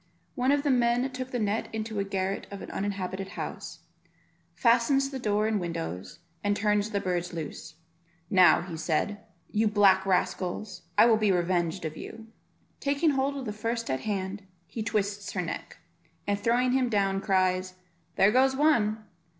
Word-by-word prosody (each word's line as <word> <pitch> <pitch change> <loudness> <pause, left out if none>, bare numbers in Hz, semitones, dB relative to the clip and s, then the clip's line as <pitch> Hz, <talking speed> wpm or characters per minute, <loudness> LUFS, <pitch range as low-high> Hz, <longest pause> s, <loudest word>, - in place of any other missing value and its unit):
One 255 +2 +1
of 285 0 +2
the 290 - +2
men 245 0 +2
took 255 0 -5
the 250 - -2
net 215 -1 -1
into 220 -1 -3
a - - +1
garret 195 0 -2
of 200 -1 -8
an - - -8
uninhabited 195 -1 -3
house, - - -6 0.7
fastens 265 +4 +3
the 265 - -4
doors 215 -2 +1
and 210 -3 0
windows, 90 - -5 0.3
and 205 0 +1
turns 210 0 +1
the 205 - -1
birds 180 -2 -2
loose. 160 -3 -7 0.5
"Now," 180 -3 +4
said 165 +6 -1 0.3
he, 210 - -1
"you 220 - +4
black 200 -2 +5
rascals, 185 +1 -1 0.2
I - - +8
will 230 -2 +5
be 215 -2 +2
revenged 175 -1 0
of 155 0 -5
you." 225 0 -9 0.5
Taking 285 +3 +2
hold 275 +1 0
of 265 - -5
the 210 - -3
first 230 - -3
at 130 - -1
hand, 200 -1 -3 0.2
he 225 - -6
twists 205 -2 -2
her - - -1
neck, - - -6 0.5
and 205 0 0
throwing 240 +3 +2
him 255 -1 +2
down, 195 -3 +1
cries, 185 -1 +1 0.4
"There 195 +2 +5
goes 265 +2 +4
one." 225 -8 +2
205 Hz, 170 wpm, -28 LUFS, 190-235 Hz, 0.7 s, I